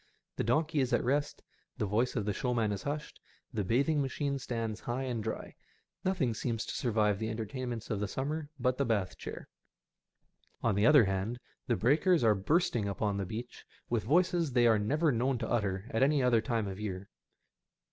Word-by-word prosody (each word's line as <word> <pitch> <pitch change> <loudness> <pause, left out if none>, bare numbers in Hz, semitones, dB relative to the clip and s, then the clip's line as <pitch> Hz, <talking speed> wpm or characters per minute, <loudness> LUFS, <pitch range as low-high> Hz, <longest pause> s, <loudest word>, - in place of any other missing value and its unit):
The - - 0
donkey 155 +6 +1
is 130 -2 +1
at - - +3
rest^ 145 +4 0 0.4
the - - 0
voice 110 +5 0
of 105 -5 -1
the 105 - 0
showman 115 -2 0
is 100 - -3
hushed, 150 +1 -5 0.3
the 105 -3 -1
bathing 140 - +2
machine 140 +1 -2
stands 115 -4 -3
high 125 +2 -3
and 120 -4 -2
dry. 110 - -4 0.5
Nothing 175 -11 +1
seems 115 0 -2
to - - -5
survive 105 -4 +1
the 110 0 -2
entertain 115 +3 -4
ments 115 -2 -5
of 105 - 0
the 105 - -1
summer, 145 +7 -3
but 125 +1 +1
the - - +4
bath 100 -6 0
chair. - - -7 1.2
On 115 - +3
the 100 +4 +3
other 145 -7 +7
hand, 95 +5 -2 0.3
the 120 - +2
breakers 150 - +3
are 110 -2 +6
bursting 110 - +1
upon 100 +1 -1
the 100 -2 -2
beach 120 +4 -7 0.3
with 120 -2 +2
voices 170 - +2
they 120 -1 +4
are 110 -2 +5
never 150 +9 +2
known 125 +2 +1
to 115 -1 -3
utter 100 -4 -1
at 115 - 0
any 140 0 +4
other 120 -3 +4
time 115 -4 -1
of 95 -1 -5
the - - -8
year. 95 -1 -5
120 Hz, 200 wpm, -31 LUFS, 105-135 Hz, 1.2 s, other